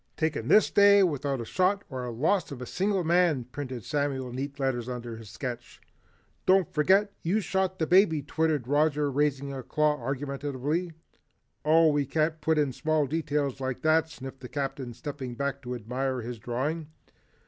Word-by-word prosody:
"Taken 160 -8 -1
this 215 - +5
day 200 -1 +6
without 140 -6 -1
a - - -5
shot 190 - +1
or 130 -3 -5
the 120 - -4
loss 160 - 0
of 135 - -6
a 125 - -5
single 195 +5 0
man," 170 -5 +3
printed 125 -1 -6
Samuel 140 -3 -1
in 120 - -8
neat 140 +2 -5
letters 130 -3 -1
under 120 -2 -5
his 110 -2 -11
sketch. 120 +6 -6 0.7
"Don't 185 -3 +4
forget, 195 +7 +3
you 185 +6 +1
shot 190 -1 -1
the 160 - 0
baby," 165 -4 +4
twittered 155 -3 0
Roger 145 0 +2
raising 140 0 0
a 135 - -5
claw 150 +1 +1
argumentatively. 140 +5 -2 0.7
"Oh, 160 +1 +5
we 145 -2 +1
can't 155 +2 0
put 160 +1 +2
in 145 -3 +1
small 155 +1 +1
details 145 -2 -1
like 130 -1 -3
that," 160 0 +3
sniffed 135 -4 -9
the 125 - -9
Captain 135 -4 -4
stepping 135 -4 -6
back 140 +1 -2
to 125 0 -5
admire 125 +3 -2
his 120 0 -6
drawing. 140 +8 -2
145 Hz, 175 wpm, -28 LUFS, 130-160 Hz, 0.7 s, day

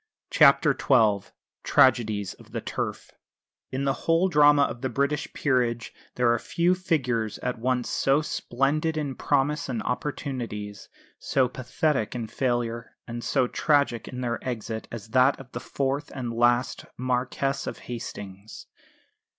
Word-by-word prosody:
CHAPTER - - +6
XII 110 -7 +2 0.3
TRAGEDIES 110 -6 +3
OF - - -17
THE - - -2
TURF - - -4 0.6
In 130 +1 -2
the 135 -1 +2 0.2
whole 165 +3 +4
drama 145 -2 +6
of 120 - -3
the 130 - -1
British 140 +4 -1
Peerage 120 -4 0 0.2
there 120 -1 +3
are 120 - 0
few 170 +8 +1
figures 130 - -1
at 125 -2 -2
once 125 0 0
so 140 +3 +2
splendid 150 +4 -1
in 145 -3 -2
promise 145 +2 0
and 120 -4 -2
opportunities, 120 -7 -4 0.3
so 130 -2 +2
pathetic 130 0 -1
in 120 -2 -3
failure 120 0 -2
and 120 0 -6
so - - +2
tragic 140 -3 +1
in 125 -1 -6
their 120 -1 -2
exit 115 -3 -4
as 115 -2 -8
that 130 +4 +4
of 130 -2 -12
the 120 - -5
fourth 140 +3 -2
and 120 -3 -4
last 120 +2 +2
Marquess 130 +2 -1
of - - -4
Hastings. 100 -4 -8
125 Hz, 140 wpm, -26 LUFS, 115-140 Hz, 0.6 s, CHAPTER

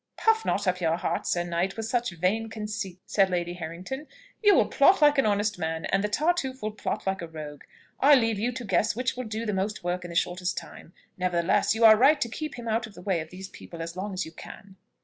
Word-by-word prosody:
"Puff 445 0 +3
not 205 - 0
up 180 -1 0
your 165 -1 +1
heart, - - -2
Sir 175 - +1
Knight, 175 +3 -2
with 225 - -3
such 240 +1 0
vain 195 +7 0
conceits," 210 -4 -5
said 195 -2 +2
Lady 175 -1 -1
Harrington. 180 - -6 0.3
"You 415 -2 +6
will - - +5
plot 380 +1 +4
like 295 -2 +5
an 265 - +3
honest 205 0 0
man, 160 0 -2
and 195 +1 +1
the 210 - 0
Tartuffe 270 -1 0
will 215 - -1
plot 210 - -4
like 190 -1 -1
a 170 - -5
rogue. 150 -3 -8 0.4
I 290 +2 +7
leave 225 -5 +1
you 240 +4 0
to 245 0 -6
guess 195 +2 +1
which 250 +1 -1
will 255 0 -5
do 220 +1 -4
the 210 - -1
most 195 +1 -2
work 180 +1 -2
in 175 - -7
the 170 - -8
shortest 180 +1 -1
time. 170 - -9 0.3
Nevertheless, 180 +3 +2
you 225 +1 +4
are 220 -1 +10
right 275 +7 +5
to 235 - -1
keep 305 +6 -5
him 240 -1 -8
out 225 +1 0
of 205 - -16
the - - -11
way 190 -3 0
of 160 0 -6
these 190 +2 -9
people 170 - -11
as 165 +1 -5
long 200 +3 -4
as 185 +1 -3
you 160 - -10
can." 190 +3 -12
200 Hz, 250 wpm, -27 LUFS, 175-230 Hz, 0.4 s, are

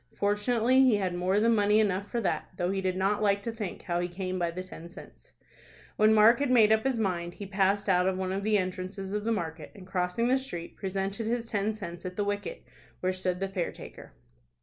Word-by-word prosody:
Fortunately 230 +5 +2
he 255 -4 +5
had 190 -3 -1
more 185 +3 +1
than 230 +2 +4
money 210 0 +4
enough 200 -1 0
for 240 - -1
that, 170 -6 -1
though 175 0 0
he 195 0 -1
did 185 -1 -1
not 200 +2 +1
like 200 -1 +2
to 230 - -2
think 215 -5 -6
how 175 -1 -1
he 175 - -1
came 185 +1 -4
by 170 -1 0
the 180 +2 -5
ten 170 -2 -11
cents. 60 - -14 0.6
When 215 +1 +5
Mark 220 +3 +6
had 285 -2 0
made 225 -4 +5
up 220 +3 +3
his 265 -3 +1
mind, 175 -5 -2
he 200 - -7
passed 195 +1 +1
out 180 -1 +3
of 190 -1 0
one 185 0 -2
of 195 +1 -2
the 215 0 +3
entrances 185 +1 -4
of 210 +1 -2
the 230 - +1
market, 160 -7 -4
and, 195 -3 -11
crossing 185 +5 -1
the 260 +2 +3
street, 175 -11 -7
presented 195 +2 -3
his 235 0 -1
ten 215 -1 -1
cents 175 -5 -8
at 185 -1 -6
the 205 - 0
wicket, 205 - -3 0.4
where 185 0 +1
stood 185 -1 -2
the 195 - -1
fare 190 -3 -2
taker. - - -12
195 Hz, 235 wpm, -29 LUFS, 185-215 Hz, 0.6 s, Mark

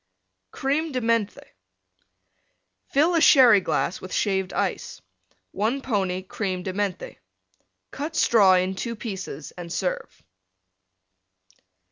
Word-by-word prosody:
CREME 290 - -2
DE 255 - 0
MENTHE 230 -3 -1 1.4
Fill 310 +6 +2
a 335 - +2
Sherry 250 -9 +7
glass 180 - -2
with 185 - -9
Shaved 190 -2 0
Ice. - - -3 0.5
1 225 +7 -1
pony 190 -6 -1
Creme 185 -1 -4
de 185 - -4
Menthe. 195 -2 -3 0.7
Cut 305 +3 -5
Straw 200 -5 +5
in 185 +1 +1
two 230 +5 -4
pieces 190 - -7
and 175 -1 -8
serve. 180 +1 -4
205 Hz, 110 wpm, -24 LUFS, 185-255 Hz, 1.4 s, Sherry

